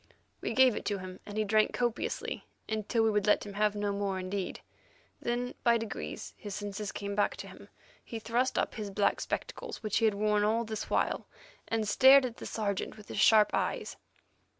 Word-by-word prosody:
We - - -2
gave 260 -3 +5
it - - -4
to 205 - 0
him, 185 -1 -8
and 205 0 -6
he 215 - +2
drank 215 +1 +3
copiously, 240 -2 -2 0.2
until 220 +1 0
we 220 - +3
would 210 -1 +1
let 210 - +4
him 205 - -7
have 210 +1 +1
no 205 0 -1
more 200 -1 -1
indeed. 185 0 -3 0.6
Then, 245 +1 -2
by 235 -1 +5
degrees, 225 -1 -6
his 205 -2 -6
senses 205 -1 -4
came 200 +1 -4
back 205 0 +1
to - - -7
him. - - -13 0.3
He 230 - -6
thrust 235 +4 0
up - - 0
his 215 -3 -5
black 200 +1 +1
spectacles 475 - -4
which 215 -2 0
he 225 - +3
had 215 -2 +3
worn 210 0 +2
all 225 +2 +2
this 220 -1 -5
while, - - 0 0.4
and 225 -2 -1
stared 265 +4 +7
at 240 -2 -5
the - - -7
Sergeant 205 -1 -2
with 210 - -14
his - - -3
sharp 210 0 +6
eyes. - - -1
215 Hz, 200 wpm, -31 LUFS, 205-225 Hz, 0.6 s, stared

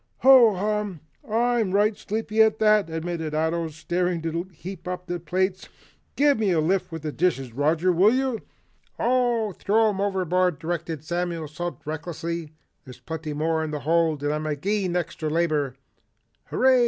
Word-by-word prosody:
"Ho 250 -5 +7
hum! 205 -3 -2 0.3
I'm 230 -3 +1
right 205 +2 +3
sleepy 220 +1 -1
at 220 0 +4
that," 215 -4 +3
admitted 160 -1 -3
Ato, 160 +1 0
starting 175 +3 -1
to 165 +3 -3
heap 180 +2 -9
up 180 0 -5 0.2
plates. 185 +2 -1 0.5
"Give 285 -3 +3
me 210 -3 +2
a 170 -3 +2
lift 180 +4 0
with 160 -1 -6
the 155 - -2
dishes, 135 -8 0
Roger, 155 +7 +2
will 185 +5 +5
you?" 260 -2 0 0.6
"Oh, 240 -3 +1
throw 215 +4 +2
'em 195 -2 -2
overboard," 185 -3 +1
directed 165 -1 -4
Samuel 170 -1 -2
Salt 175 +4 -6
recklessly. 165 +1 -4 0.3
"There's 130 -4 -12
plenty 160 -2 -5
more 160 +1 0
in 160 - -3
the 150 -1 -4
hold 160 -1 +1
and 145 0 +1
I'm 155 0 -3
agin 180 +5 -1
all 180 - +3
extry 160 -1 -5
labor." 150 -5 0 0.7
"Hurray!" 260 -1 +3
175 Hz, 160 wpm, -25 LUFS, 160-210 Hz, 0.7 s, Ho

